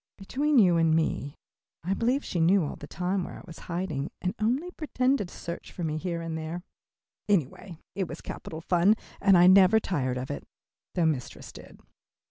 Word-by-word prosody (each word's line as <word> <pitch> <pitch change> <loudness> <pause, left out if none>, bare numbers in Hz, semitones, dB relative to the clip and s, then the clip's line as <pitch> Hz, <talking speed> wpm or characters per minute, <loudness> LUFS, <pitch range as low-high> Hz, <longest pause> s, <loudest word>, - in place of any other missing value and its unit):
Between 275 +9 0
you 180 -7 +6
and 165 -1 +3
me 155 -3 -1 0.5
I 185 +3 0
believe 245 +7 0
she 175 - -2
knew 180 +3 +4
all - - -5
the 145 - -10
time 180 +4 -1
where - - -7
I - - -12
was 165 - -11
hiding 170 -5 -2
and 180 +1 -2
only 260 +11 0
pretended 260 - 0
to - - -13
search 170 0 -7
for 175 - -6
me 155 -1 -1
here 170 0 -3
and 165 -1 -4
there. 160 +2 -5 0.7
Anyway 170 -1 -1 0.2
it 190 -2 -2
was - - -7
capital 160 0 -7
fun, 180 +5 +3 0.3
and 195 -2 +6
I 175 - +7
never 190 +3 +7
tired 130 -11 -1
of 125 +1 -4
it, 70 - -5 0.5
though 175 -3 +2
mistress 145 -6 -3
did. - - -13
180 Hz, 190 wpm, -28 LUFS, 160-200 Hz, 0.7 s, I